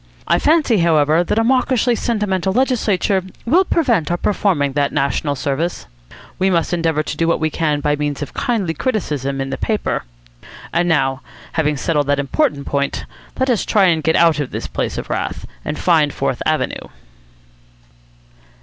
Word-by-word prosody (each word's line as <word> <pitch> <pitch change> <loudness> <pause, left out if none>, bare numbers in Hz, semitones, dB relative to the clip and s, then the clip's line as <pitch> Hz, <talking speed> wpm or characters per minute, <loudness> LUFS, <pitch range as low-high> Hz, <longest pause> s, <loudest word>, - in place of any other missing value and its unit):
I - - +3
fancy, 295 - +3
however, 160 -1 +3
that 175 - -1
a 225 - +3
mawkishly 250 0 +2
sentimental 205 -5 -1
legislature 210 -6 +1 0.2
will 330 +11 +4
prevent 245 - +1
our 175 - 0
performing 175 -8 +1
that 140 0 +1
national 140 +1 0
service. 140 +6 -2 0.5
We 190 - +3
must 170 -1 +1
endeavour 165 -3 +1
to 155 - -5
do 165 +2 0
what 170 - +2
we 155 0 0
can 150 -2 0
by 145 0 +1
means 145 -1 -2
of - - -9
kindly 225 -11 -1
criticism 145 - -2
in 135 0 -3
the - - -4
paper. 215 - -1 0.7
And 175 +1 +1
now, 135 -4 +1 0.3
having 150 -3 0
settled 150 -2 0
that 145 0 +2
important 145 - 0
point, 140 0 -2 0.3
let 260 0 +1
us 230 - +1
try 205 -3 +3
and 160 -2 +1
get 160 +1 +1
out 165 -3 +4
of 145 - -2
this - - -5
place - - -3
of - - -5
wrath, - - -3 0.2
and 150 - -4
find 160 -5 +3
Fourth - - -2
Avenue." - - -1
165 Hz, 170 wpm, -18 LUFS, 145-215 Hz, 0.7 s, will